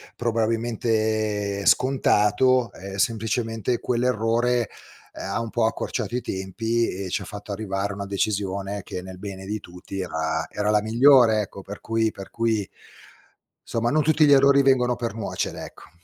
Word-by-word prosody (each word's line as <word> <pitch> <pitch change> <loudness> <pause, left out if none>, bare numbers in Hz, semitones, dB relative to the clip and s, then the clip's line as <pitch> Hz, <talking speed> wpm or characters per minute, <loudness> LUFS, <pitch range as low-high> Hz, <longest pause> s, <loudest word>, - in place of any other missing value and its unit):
probabilmente 110 -3 0
scontato, 125 -1 +3
ehm, 95 0 -9
semplicemente 115 +2 -1
quell'errore, 120 -1 +1 0.4
ehm, - - -10
ha - - -1
un 115 - -4
po' 115 0 +1
accorciato 115 +1 -2
i 125 - 0
tempi 110 +4 -1
e 95 0 -5
ci 95 - -1
ha - - -7
fatto 105 +2 -8
arrivare 100 -1 -2
a 100 - -6
una 100 - -5
decisione 100 0 -2
che, 90 - -6
nel 95 0 -10
bene 95 -1 -7
di 105 +2 -3
tutti, 90 +2 -9
era 80 -3 -2
era 105 0 -2
la 105 0 +3
migliore, 115 0 +5
ecco, 100 -1 -7
per 100 +2 -9
cui 115 0 +1
per 95 -1 -10
cui, 110 -4 0 1.0
somma, 115 0 -1
non 155 +1 +3
tutti 155 0 +4
gli 145 - +4
errori 140 0 +6
vengono 125 -2 +3
per 115 -3 -3
nuocere, 110 -3 -3
ecco. - - -14
110 Hz, 160 wpm, -24 LUFS, 100-120 Hz, 1.0 s, errori